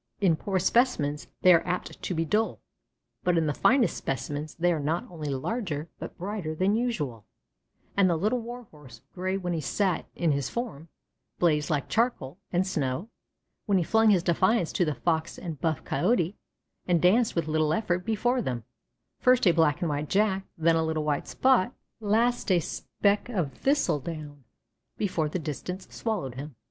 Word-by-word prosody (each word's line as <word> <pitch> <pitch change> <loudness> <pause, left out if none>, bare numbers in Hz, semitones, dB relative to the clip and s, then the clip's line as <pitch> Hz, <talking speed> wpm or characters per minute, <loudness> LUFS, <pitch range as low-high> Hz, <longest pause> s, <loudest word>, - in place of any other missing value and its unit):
In 185 -6 +4
poor 190 +4 -2
specimens 180 - +1 0.2
they 185 - +8
are 170 - +4
apt 180 +1 -4
to 180 - -3
be 165 +1 0
dull, 215 +7 0 0.6
but 180 -1 +2
in 165 - +2
the 150 - 0
finest 245 - +3
specimens 145 +4 -4
they 175 +1 +2
are 160 - -1
not 155 +4 -1
only 155 -4 -5
larger, 155 - -3
but - - -7
brighter 185 -4 -4
than 185 +5 +2
usual, 150 - -2 0.7
and 195 -2 +4
the 170 - +2
Little 210 +9 +1
Warhorse, 175 - -10
gray 185 +1 -1
when 180 -2 -2
he 165 - -1
sat 185 +5 0
in 165 -2 +1
his 140 -2 -1
form, 220 - -5 0.5
blazed 150 -4 +2
like 145 -3 0
charcoal 195 - 0
and 180 +1 +2
snow, 155 - -2 0.6
when 200 -2 +3
he 180 - +2
flung 220 +5 +4
his 185 -5 +4
defiance 185 +2 +2
to 180 - +2
the 150 -2 -1
Fox 165 -1 -1
and 165 -6 -6
buff 160 -3 0
Coyote, 175 - +1 0.5
and 175 -2 +3
danced 215 +7 +3
with 170 -2 0
little 155 0 +1
effort 180 -1 0
before 240 +4 +1
them, 125 - -3 0.6
first 250 -1 +4
a 180 - +7
black 160 -3 +2
and 170 - 0
white 145 +1 -2
Jack, 195 -1 +1
then 165 0 +3
a 160 - +2
little 160 -1 -1
white 150 -1 -1
spot, 255 -4 +2 0.2
and 210 -2 -5
last 235 0 +2
a 180 - +5
speck 200 +6 -1
of 175 - -1
thistledown, 150 - -1 0.5
before 170 -7 0
the 170 - -2
distance 180 +4 -5
swallowed 205 - -3
him. 140 +2 -8
175 Hz, 180 wpm, -27 LUFS, 150-210 Hz, 0.7 s, they